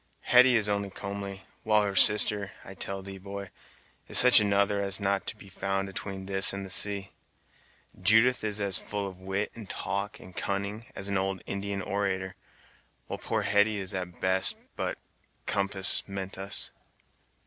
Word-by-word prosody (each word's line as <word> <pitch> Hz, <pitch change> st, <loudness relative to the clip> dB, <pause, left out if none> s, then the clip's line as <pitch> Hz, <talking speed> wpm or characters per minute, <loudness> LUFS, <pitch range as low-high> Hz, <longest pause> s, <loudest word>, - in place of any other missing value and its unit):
Hetty 125 Hz, 0 st, +5 dB
is 110 Hz, -3 st, +2 dB
only 100 Hz, -1 st, -2 dB
comely, 100 Hz, 0 st, -7 dB, 0.2 s
while 105 Hz, -1 st, +2 dB
her 100 Hz, -1 st, -3 dB
sister, 105 Hz, 0 st, +4 dB
I 95 Hz, -, -10 dB
tell 95 Hz, 0 st, -6 dB
thee, 95 Hz, 0 st, -8 dB
boy, 100 Hz, 0 st, -8 dB, 0.6 s
is -, -, +5 dB
such 125 Hz, -2 st, +9 dB
another 100 Hz, 0 st, +1 dB
as 100 Hz, -1 st, -1 dB
is -, -, -6 dB
not 100 Hz, -1 st, -1 dB
to -, -, -4 dB
be 100 Hz, -, -14 dB
found 95 Hz, 0 st, -3 dB
atween 95 Hz, 0 st, -6 dB
this 95 Hz, 0 st, +4 dB
and 100 Hz, 0 st, -5 dB
the 95 Hz, -, -7 dB
sea: 100 Hz, 0 st, +2 dB, 0.9 s
Judith 110 Hz, +6 st, +3 dB
is 105 Hz, -1 st, 0 dB
as 100 Hz, -2 st, +4 dB
full 100 Hz, -1 st, -5 dB
of 95 Hz, -1 st, -11 dB
wit, 95 Hz, +2 st, -3 dB
and 110 Hz, -4 st, -11 dB
talk, 100 Hz, +1 st, -4 dB
and 95 Hz, -, -14 dB
cunning, 100 Hz, +3 st, -4 dB
as 100 Hz, -, -4 dB
an 100 Hz, -1 st, 0 dB
old 95 Hz, -1 st, -3 dB
Indian 100 Hz, 0 st, -4 dB
orator, 95 Hz, -1 st, -3 dB, 0.7 s
while -, -, -7 dB
poor -, -, -2 dB
Hetty 105 Hz, +1 st, +2 dB
is 95 Hz, -2 st, -3 dB
at 90 Hz, -2 st, -4 dB
the -, -, -24 dB
best 95 Hz, 0 st, +1 dB, 0.2 s
but -, -, -4 dB, 0.5 s
'compass' 100 Hz, -1 st, +3 dB
meant 95 Hz, -1 st, -6 dB
us." 95 Hz, +1 st, 0 dB
100 Hz, 175 wpm, -28 LUFS, 95-100 Hz, 0.9 s, such